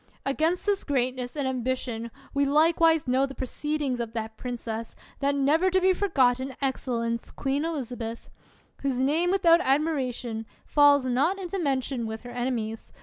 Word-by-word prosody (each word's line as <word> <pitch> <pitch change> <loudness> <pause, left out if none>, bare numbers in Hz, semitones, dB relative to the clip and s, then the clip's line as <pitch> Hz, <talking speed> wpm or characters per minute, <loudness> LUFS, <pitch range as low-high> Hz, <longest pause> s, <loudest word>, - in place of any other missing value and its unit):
Against 315 +6 0
this 405 -1 +1
greatness 255 -2 -1
and 280 -2 0
ambition 250 -2 -2 0.2
we 280 0 +2
likewise 320 +2 +4
know 260 +2 +2
the 270 - -9
proceedings 285 0 -2
of 230 -1 -4
that 220 -1 -4
princess, 230 -2 -5 0.2
that 280 0 +1
never 300 +7 +3
to 375 0 +3
be 375 0 +4
forgotten 265 -9 +1
excellence, 235 -4 -2
Queen 280 +2 -1
Elizabeth; 245 -8 -4 0.5
whose 270 -3 -1
name, 305 +7 +2
without 345 -3 +5
admiration, 260 -7 -1 0.2
falls 285 -2 +5
not 275 +10 +1
into 385 +1 -4
mention 265 -5 -1
with 220 0 -5
her 245 - -9
enemies. 240 -3 -3
270 Hz, 145 wpm, -27 LUFS, 245-310 Hz, 0.5 s, without